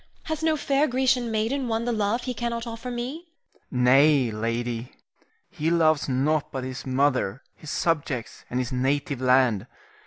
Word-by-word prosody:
Has 315 Hz, -1 st, -3 dB
no 320 Hz, -1 st, +2 dB
fair 285 Hz, +1 st, +2 dB
Grecian 255 Hz, -2 st, +1 dB
maiden 230 Hz, +5 st, -1 dB
won 225 Hz, 0 st, -1 dB
the 245 Hz, -, 0 dB
love 220 Hz, +2 st, 0 dB
he 255 Hz, -, -3 dB
cannot 235 Hz, 0 st, -3 dB
offer 230 Hz, +1 st, -6 dB
me? 255 Hz, +8 st, -5 dB, 0.4 s
Rienzi. 125 Hz, -1 st, 0 dB
Nay, 135 Hz, -1 st, +5 dB
lady. 115 Hz, +2 st, -3 dB, 0.6 s
He 155 Hz, +2 st, -1 dB
loves 160 Hz, -4 st, +3 dB
nought 145 Hz, +4 st, +1 dB
but 130 Hz, -1 st, -4 dB
his 130 Hz, +1 st, -6 dB
mother, 130 Hz, -4 st, +1 dB
his 155 Hz, -, -11 dB
subjects, 145 Hz, -8 st, -2 dB
and 125 Hz, -, -1 dB
his 130 Hz, +1 st, -2 dB
native 135 Hz, +1 st, -1 dB
land. 125 Hz, -4 st, +3 dB
155 Hz, 160 wpm, -25 LUFS, -, 0.6 s, Nay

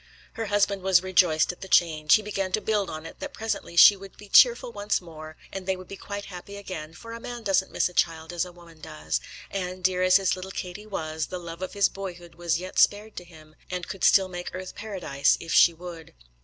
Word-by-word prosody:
Her 225 Hz, -1 st, -4 dB
husband 205 Hz, -1 st, +1 dB
was 185 Hz, -1 st, +4 dB
rejoiced 180 Hz, -4 st, +3 dB
at 180 Hz, -, -15 dB
the 190 Hz, -, -7 dB
change. 155 Hz, -4 st, +4 dB
He 215 Hz, -, 0 dB
began 195 Hz, -2 st, -3 dB
to -, -, +3 dB
build 210 Hz, -3 st, 0 dB
on 155 Hz, 0 st, -7 dB
it 165 Hz, -, -10 dB
that 290 Hz, 0 st, -7 dB
presently 220 Hz, -6 st, -4 dB
she 200 Hz, +4 st, +9 dB
would 195 Hz, 0 st, -13 dB
be 210 Hz, -, -13 dB
cheerful -, -, +6 dB
once 205 Hz, -, -1 dB
more, 155 Hz, -2 st, -11 dB, 0.2 s
and 195 Hz, -1 st, -6 dB
they 190 Hz, -, +1 dB
would 185 Hz, -1 st, -11 dB
be 195 Hz, -, -8 dB
quite 200 Hz, +1 st, -7 dB
happy 200 Hz, +2 st, -9 dB
again; 165 Hz, -6 st, -7 dB
for 230 Hz, +4 st, -10 dB
a 230 Hz, -, -7 dB
man 240 Hz, 0 st, -7 dB
doesn't 190 Hz, -2 st, +1 dB
miss -, -, +1 dB
a 180 Hz, -, -11 dB
child 165 Hz, 0 st, 0 dB
as 175 Hz, 0 st, 0 dB
a 180 Hz, -, -8 dB
woman 170 Hz, -2 st, -17 dB
does, 155 Hz, -1 st, -3 dB, 0.3 s
and, 185 Hz, -1 st, -4 dB
dear 185 Hz, 0 st, +2 dB
as 185 Hz, 0 st, +4 dB
his 195 Hz, -2 st, +3 dB
little 185 Hz, +1 st, -8 dB
Katie 190 Hz, +2 st, -7 dB
was, 160 Hz, -5 st, -3 dB
the 180 Hz, -, -5 dB
love 170 Hz, 0 st, -9 dB
of 185 Hz, -, -5 dB
his 200 Hz, -1 st, +4 dB
boyhood 175 Hz, -3 st, -8 dB
was 170 Hz, 0 st, -1 dB
yet 185 Hz, +2 st, -4 dB
spared 210 Hz, +1 st, +3 dB
to -, -, -5 dB
him, 155 Hz, -3 st, -17 dB, 0.2 s
and 180 Hz, -1 st, -4 dB
could 195 Hz, -, -7 dB
still 190 Hz, -1 st, +5 dB
make 175 Hz, -1 st, -7 dB
earth 185 Hz, 0 st, -7 dB
paradise 180 Hz, -10 st, 0 dB
if 165 Hz, -, -5 dB
she 175 Hz, -, +7 dB
would. 170 Hz, -, -10 dB
185 Hz, 235 wpm, -26 LUFS, 170-200 Hz, 0.3 s, she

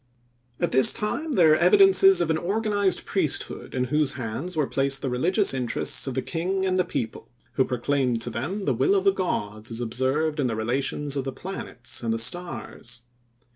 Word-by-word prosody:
At -, -, 0 dB
this 130 Hz, 0 st, +7 dB
time, 285 Hz, +9 st, -3 dB
there 165 Hz, -8 st, +5 dB
are -, -, +3 dB
evidences 385 Hz, -, +5 dB
of 165 Hz, -, +1 dB
an 160 Hz, -, +1 dB
organized 205 Hz, 0 st, -1 dB
priesthood -, -, -1 dB
in 125 Hz, -, 0 dB
whose 150 Hz, -3 st, +3 dB
hands 130 Hz, +8 st, -5 dB
were 150 Hz, -, +2 dB
placed 135 Hz, 0 st, 0 dB
the 135 Hz, -, -2 dB
religious 180 Hz, -, +1 dB
interests 130 Hz, +1 st, -1 dB
of 130 Hz, -, -4 dB
the 130 Hz, -, -1 dB
king 185 Hz, +3 st, -2 dB
and 185 Hz, -1 st, 0 dB
the 185 Hz, -, +2 dB
people, 115 Hz, -10 st, -5 dB, 0.2 s
who 130 Hz, -, +1 dB
proclaimed 125 Hz, -1 st, -1 dB
to 120 Hz, -, -5 dB
them 165 Hz, -, -4 dB
the 140 Hz, -, +1 dB
will 130 Hz, -, +2 dB
of 195 Hz, -, +1 dB
the 195 Hz, 0 st, +4 dB
gods 110 Hz, -, -3 dB
as 115 Hz, 0 st, -4 dB
observed 130 Hz, +6 st, -1 dB
in 135 Hz, -, +1 dB
the 115 Hz, -, -2 dB
relations 135 Hz, +5 st, -2 dB
of 135 Hz, -, -1 dB
the 135 Hz, -, -4 dB
planets 130 Hz, -6 st, -5 dB
and 115 Hz, -1 st, -2 dB
the 115 Hz, -, 0 dB
stars. 120 Hz, -3 st, -3 dB
140 Hz, 195 wpm, -25 LUFS, 125-185 Hz, 0.2 s, this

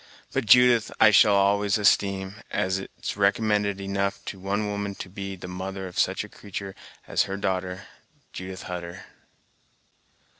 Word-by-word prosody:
But 135 Hz, -4 st, -1 dB
Judith 125 Hz, -1 st, +6 dB
I 110 Hz, -, +7 dB
shall 105 Hz, 0 st, +6 dB
always 100 Hz, +1 st, +3 dB
esteem, 100 Hz, -1 st, +1 dB
as 95 Hz, +1 st, 0 dB
it's 95 Hz, -, -6 dB
recommend 105 Hz, +1 st, +2 dB
enough 100 Hz, 0 st, -2 dB
to 95 Hz, -, -6 dB
one 100 Hz, +3 st, -1 dB
woman 100 Hz, -1 st, -3 dB
to -, -, -7 dB
be 100 Hz, 0 st, -6 dB
the 90 Hz, -1 st, -9 dB
mother 95 Hz, +1 st, -5 dB
of 90 Hz, -, -5 dB
such -, -, +1 dB
a -, -, -9 dB
creatur' 100 Hz, -1 st, -7 dB, 0.3 s
as -, -, +2 dB
her 100 Hz, 0 st, -4 dB
darter, 95 Hz, -1 st, -2 dB, 0.5 s
Judith 95 Hz, 0 st, -7 dB
Hutter!" 90 Hz, 0 st, -7 dB
100 Hz, 150 wpm, -25 LUFS, 95-100 Hz, 0.5 s, I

